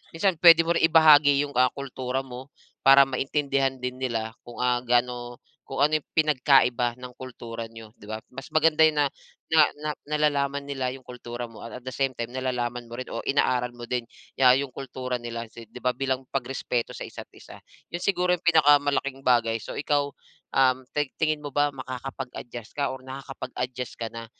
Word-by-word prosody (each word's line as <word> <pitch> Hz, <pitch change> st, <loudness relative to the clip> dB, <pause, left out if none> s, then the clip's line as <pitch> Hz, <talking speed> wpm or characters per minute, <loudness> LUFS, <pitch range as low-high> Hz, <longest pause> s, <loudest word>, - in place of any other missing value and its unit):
minsan 185 Hz, +2 st, +2 dB
puwede 165 Hz, -2 st, +9 dB
mo -, -, +2 dB
rin -, -, +4 dB
ibahagi 150 Hz, -3 st, +6 dB
yung, 140 Hz, -, -9 dB
ah, 130 Hz, -, +6 dB
kultura 130 Hz, -1 st, -3 dB
mo 130 Hz, +1 st, -9 dB, 0.4 s
para 135 Hz, +1 st, +8 dB
maintindihan 135 Hz, 0 st, 0 dB
din 125 Hz, 0 st, -5 dB
nila 115 Hz, -3 st, -2 dB
kung, 120 Hz, -, -11 dB
ah, 125 Hz, -1 st, +2 dB
gaano 120 Hz, 0 st, 0 dB, 0.3 s
kung 140 Hz, -, 0 dB
ano 155 Hz, +1 st, +2 dB
yung -, -, -41 dB
pinagkaiba 130 Hz, -5 st, +3 dB
ng 125 Hz, 0 st, -9 dB
kultura 115 Hz, -3 st, -7 dB
niyo, 110 Hz, -1 st, -12 dB
'di -, -, -15 dB
ba? 110 Hz, -, -3 dB, 0.2 s
Mas 135 Hz, +1 st, -8 dB
maganda 155 Hz, 0 st, +3 dB
yun 155 Hz, -1 st, +2 dB
na 145 Hz, -, +4 dB, 0.5 s
na 160 Hz, -, +7 dB, 0.2 s
na 155 Hz, +1 st, -4 dB, 0.2 s
nalalaman 145 Hz, -2 st, 0 dB
nila 135 Hz, -3 st, -2 dB
yung 130 Hz, -, -20 dB
kultura 120 Hz, -1 st, -7 dB
mo, 115 Hz, -1 st, -13 dB
at 115 Hz, -, -8 dB
at -, -, -28 dB
the 130 Hz, -, -5 dB
same 135 Hz, +2 st, +1 dB
time, 120 Hz, +1 st, -5 dB
nalalaman 125 Hz, -2 st, -2 dB
mo 120 Hz, -, -8 dB
rin 130 Hz, -, -4 dB
o -, -, -3 dB
inaaral 125 Hz, -3 st, +1 dB
mo 120 Hz, -, -7 dB
din 125 Hz, 0 st, -1 dB, 0.4 s
ya 130 Hz, -1 st, +6 dB
yung 135 Hz, -2 st, -4 dB
kultura 125 Hz, -2 st, -5 dB
nila. 115 Hz, 0 st, -5 dB
Kasi 115 Hz, 0 st, -13 dB
'di 115 Hz, -, -11 dB
ba 125 Hz, 0 st, +1 dB
bilang 130 Hz, 0 st, -2 dB
pagrespeto 125 Hz, -2 st, -2 dB
sa -, -, -6 dB
isa't -, -, -10 dB
isa. -, -, -13 dB, 0.3 s
Yun 175 Hz, -, -3 dB
siguro 180 Hz, -2 st, +2 dB
yung 175 Hz, -, -2 dB
pinakamalaking 145 Hz, -4 st, +3 dB
bagay. 115 Hz, -2 st, +3 dB
So, -, -, -7 dB
ikaw, 145 Hz, -1 st, +1 dB, 0.5 s
um, 130 Hz, -1 st, +5 dB, 0.2 s
tig 145 Hz, -2 st, -1 dB
tingin 155 Hz, -1 st, +2 dB
mo 145 Hz, -2 st, -7 dB
ba 145 Hz, 0 st, +3 dB
makakapag-adjust 130 Hz, -2 st, -7 dB
ka 140 Hz, -1 st, -1 dB
or 130 Hz, -, -9 dB
nakakapag-adjust 130 Hz, -2 st, -6 dB
ka 115 Hz, -, -3 dB
na, 115 Hz, 0 st, -7 dB
130 Hz, 190 wpm, -26 LUFS, 120-145 Hz, 0.5 s, puwede